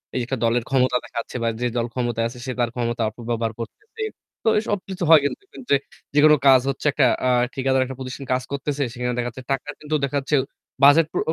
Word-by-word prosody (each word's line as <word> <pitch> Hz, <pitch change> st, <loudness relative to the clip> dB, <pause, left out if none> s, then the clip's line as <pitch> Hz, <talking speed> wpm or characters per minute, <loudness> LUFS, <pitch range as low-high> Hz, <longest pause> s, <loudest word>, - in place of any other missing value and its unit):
এই -, -, +1 dB
যে -, -, -2 dB
একটা 135 Hz, -, -2 dB
দলের 115 Hz, +1 st, +2 dB
ক্ষমতা 130 Hz, -2 st, +2 dB
দেখাচ্ছে 115 Hz, +2 st, -6 dB
বা -, -, +1 dB
যে -, -, +1 dB
দল 115 Hz, -, +1 dB
ক্ষমতায় 120 Hz, -2 st, -1 dB
আছে, 120 Hz, +1 st, -10 dB
সে 130 Hz, -, -3 dB
তার 120 Hz, -1 st, +2 dB
ক্ষমতা 120 Hz, -1 st, -2 dB
অপব্যবহার 115 Hz, 0 st, -3 dB
করতেছে। 425 Hz, -, -9 dB, 0.4 s
তো -, -, -3 dB
এইসব 210 Hz, -1 st, -1 dB
কিছু 190 Hz, -1 st, -4 dB
হয় 160 Hz, -2 st, +9 dB
কিন্তু 145 Hz, -, -2 dB
দেখবেন 385 Hz, -, -13 dB
যে -, -, +7 dB, 0.4 s
যেকোনো 150 Hz, +1 st, +6 dB
কাজ 130 Hz, -2 st, +7 dB
হচ্ছে 135 Hz, +2 st, -2 dB
আ -, -, +2 dB
একটা -, -, +3 dB, 0.5 s
ঠিকাদার 130 Hz, 0 st, +1 dB
একটা 130 Hz, 0 st, -7 dB
প্রতিষ্ঠান 130 Hz, +1 st, -6 dB
কাজ 130 Hz, 0 st, 0 dB
করতেছে। 140 Hz, 0 st, -2 dB
সেখানে 125 Hz, 0 st, -2 dB
দেখা 120 Hz, 0 st, -1 dB
যাচ্ছে 130 Hz, +2 st, -10 dB
টাকা 135 Hz, +2 st, -2 dB
কিন্তু 155 Hz, 0 st, -2 dB
দেখা 140 Hz, +1 st, 0 dB
যাচ্ছে 140 Hz, +2 st, 0 dB, 0.5 s
বাজেট 150 Hz, +3 st, +7 dB
প্র -, -, 0 dB
130 Hz, 220 wpm, -23 LUFS, 120-145 Hz, 0.5 s, হয়